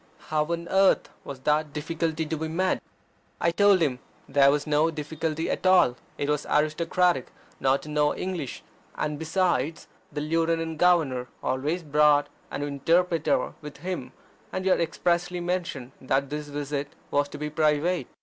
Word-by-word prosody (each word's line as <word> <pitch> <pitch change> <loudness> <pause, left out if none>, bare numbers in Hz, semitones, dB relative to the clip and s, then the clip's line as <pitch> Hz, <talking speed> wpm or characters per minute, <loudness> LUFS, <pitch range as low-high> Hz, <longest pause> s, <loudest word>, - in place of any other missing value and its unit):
How 155 -1 +2
on 170 +1 -3
earth 195 0 +4
was 135 -2 -8
that 150 +1 +1
difficulty 160 +1 -2
to 160 - -2
be 160 +1 -3
met? 185 +4 0 0.6
I 170 - +2
told 200 +1 +4
him 135 -6 +1 0.3
there 140 -1 +5
was 145 +1 +1
no 150 +2 +3
difficulty 160 +1 -3
at - - -1
all: 180 -10 +5 0.2
it 140 - -2
was 150 0 -1
aristocratic 165 0 +2 0.3
not 135 +1 +2
to 150 - -9
know 150 0 +2
English: 175 -8 -4 0.3
and, 150 -1 -2
besides, 160 -3 0 0.2
the 145 0 -3
Lieutenant 165 0 0
Governor 150 -9 +3 0.2
always 150 +7 -1
brought 150 -1 +4 0.2
an 145 - -4
interpreter 165 +5 +1
with 150 -1 -9
him, 155 -5 -5 0.4
and 185 0 -3
he 190 - +3
had - - +3
expressly 175 +1 0
mentioned 175 -8 -3
that 135 +1 0
this 150 0 -4
visit 145 0 -4 0.2
was 145 0 +1
to 150 - -8
be 150 0 -4
private. 155 0 +1
155 Hz, 160 wpm, -26 LUFS, 145-170 Hz, 0.6 s, there